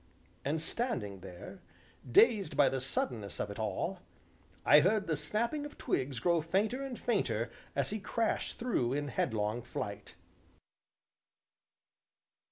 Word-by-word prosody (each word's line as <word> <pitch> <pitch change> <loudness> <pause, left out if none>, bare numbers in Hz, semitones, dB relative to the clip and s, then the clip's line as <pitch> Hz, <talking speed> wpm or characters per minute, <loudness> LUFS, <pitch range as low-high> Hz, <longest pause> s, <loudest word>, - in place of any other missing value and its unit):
And 150 +3 0
standing 140 - -1
there, 90 -1 -10 0.5
dazed 210 - +5
by 140 -2 +6
the 130 0 -2
suddenness 120 -5 -2
of 105 - -2
it 100 - -8
all, 110 -2 -2 0.7
I 150 - +9
heard 195 +6 +3
the 160 - 0
snapping 225 - -1
of 295 - -8
twigs 130 -2 -1
grow 170 +4 +3
fainter 205 - 0
and 265 -3 -5
fainter 120 - 0 0.2
as 140 +4 0
he 215 - -2
crashed 225 +3 -1
through 135 - 0
in 145 0 -1
headlong 110 -1 0
flight. 110 -5 -6
145 Hz, 130 wpm, -33 LUFS, -, 0.7 s, I